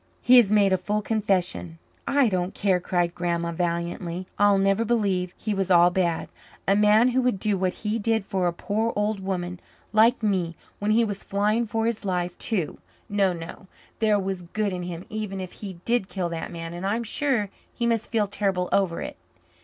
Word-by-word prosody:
He 250 +1 +7
has 220 -5 +6
made 200 -2 +4
a 185 - +2
full 210 +3 -1
confession." 190 -6 -1 0.3
"I 280 -2 +4
don't 185 -2 -1
care," 190 -3 +2
cried 175 -1 0
Grandma 170 -1 -1
valiantly. 170 +1 -2
"I'll 205 -1 +5
never 195 +3 +2
believe 200 -6 0
he 215 - -2
was 195 -1 -1
all 175 -1 +6
bad 175 -3 0 0.4
a 195 - +4
man 210 +4 +5
who 255 +1 +2
would 250 -6 +1
do 210 0 +1
what 185 -1 -1
he 215 +2 0
did 220 -1 0
for 185 -2 0
a - - +1
poor 215 +6 -1
old 210 0 0
woman 180 -2 -3 0.3
like 225 +2 +4
me, 185 -5 0 0.2
when 205 - -1
he 230 +2 +4
was 205 -2 -5
flying 210 +3 +1
for 225 +1 -1
his 230 -1 -1
life 180 -2 -1
too. 190 -9 -1 0.3
No, 200 -2 +2
no, 170 +2 -8 0.3
there 215 -2 +3
was 190 -2 -3
good 200 +3 -2
in 180 - -3
him 175 0 -6
even 210 -3 -4
if 185 -1 -6
he 200 -3 -8
did 235 -5 +1
kill 180 -3 -2
that 165 +1 -5
man. 165 -1 -6
And 175 +2 -6
I'm 215 +5 0
sure 230 -4 +1 0.2
he 235 - -3
must 230 -2 0
feel 220 -3 +2
terrible 195 -3 -1
over 190 -4 +1
it." - - -7
195 Hz, 200 wpm, -25 LUFS, 180-215 Hz, 0.4 s, He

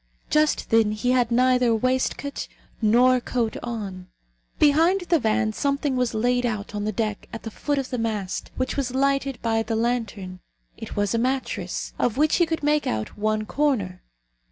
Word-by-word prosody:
Just 305 0 +2
then 225 -2 +4
he 245 +4 0
had 250 -2 +2
neither 250 -1 +3
waistcoat 260 +4 -1 0.3
nor 245 +4 +5
coat 235 -3 -1
on. 200 -6 -5 0.5
Behind 330 +6 +4
the 345 -2 +2
van 220 -1 +1
something 280 +2 0
was 250 -2 0
laid 245 +3 +1
out 215 -3 -3
on 205 0 -3
the 215 - 0
deck 215 0 -3
at 225 - -7
the 225 - -6
foot 290 +6 -2
of 270 -2 -3
the 250 - -2
mast, 215 -4 -3
which 255 - -2
was 260 -2 -2
lighted 275 0 +1
by 225 -1 +1
the 225 0 -2
lantern. 220 -6 -2 0.4
It - - -8
was 205 0 0
a 230 - +1
mattress, 260 +2 -2
of 245 0 +1
which 305 +1 +3
he 345 - +3
could 325 -2 -2
make 295 0 +2
out 110 -1 -3
one 215 0 0
corner. 220 -11 0
240 Hz, 180 wpm, -24 LUFS, 215-270 Hz, 0.5 s, nor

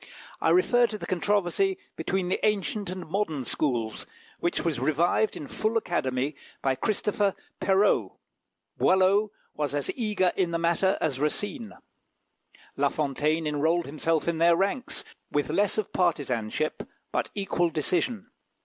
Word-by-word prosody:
I - - +3
refer 245 -10 +4
to 215 - -5
the - - -6
controversy 205 - +1 0.2
between 190 -2 -1
the - - -1
ancient 210 -1 0
and 185 -2 -6
modern 160 -7 -1
schools, 120 -8 -1 0.3
which 175 - -1
was 155 -7 0
revived 165 - +2
in - - -6
full 215 +10 -1
Academy 140 - -1 0.3
by 135 - +3
Christopher 205 - 0 0.2
Perrault. 195 +2 +2 0.6
Boileau 190 +3 +4 0.2
was 145 -2 -2
as 145 - -1
eager 210 -7 +1
in 185 -3 +1
the 170 - 0
matter 170 +3 +2
as 140 -5 -1
Racine. 205 - -1 1.0
La - - +2
Fontaine 155 +2 0
enrolled 160 +3 +1
himself 155 +3 -1
in 170 -1 0
their 170 0 +5
ranks, 200 +7 -1 0.3
with 145 0 0
less 200 +6 +1
of 215 - -2
partisanship, 145 - 0 0.3
but - - -1
equal 180 -4 +1
decision. 185 - -1
175 Hz, 140 wpm, -27 LUFS, 150-205 Hz, 1.0 s, their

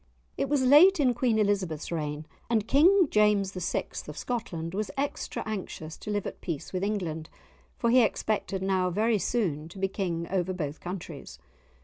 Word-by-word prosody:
It 275 - -1
was 285 -2 +2
late 310 +8 +7
in 255 -4 +4
Queen 240 -2 +1
Elizabeth's 195 -8 0
reign, 150 -2 -3 0.2
and 220 -2 +1
King 355 +6 +5
James 210 -2 +3
VI. 180 -2 -2 0.2
of - - -8
Scotland 180 -9 -4
was 210 +1 -2
extra 280 +1 -3
anxious 185 -7 -5
to - - -8
live 205 -1 -1
at - - -6
peace 165 0 -5
with 185 0 -1
England, 175 -7 -2 0.5
for 235 - +1
he 255 +1 +7
expected 210 -3 -1
now 190 -1 +1
very 215 +4 +1
soon 165 -10 -1
to 175 - -12
be 195 0 +1
King 175 -4 -3
over 185 -1 0
both 150 -5 -4
countries. 175 -5 -7
195 Hz, 170 wpm, -28 LUFS, 170-230 Hz, 0.5 s, late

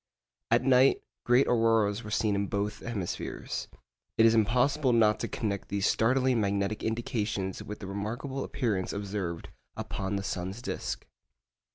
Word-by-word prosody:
At - - +3
night 130 0 +4 0.2
great 125 +2 +5
auroras 115 -2 +2
were 105 - -7
seen 105 0 +1
in 100 0 0
both 105 +1 -2
hemispheres. 105 -7 -4 0.5
It 115 - +6
is 115 - +6
impossible 125 +5 +3
not 110 -2 +4
to - - -2
connect 100 -3 -3
these 100 0 0
startling 125 +1 +3
magnetic 100 +1 0
indications 110 -4 -2
with 105 - -7
the - - -5
remarkable 115 +8 -4
appearance 100 -7 -1
observed 100 -4 -4 0.3
upon 95 +1 -3
the 100 - -2
sun's 95 +2 -4
disc. 65 - -4
105 Hz, 145 wpm, -29 LUFS, 100-120 Hz, 0.5 s, It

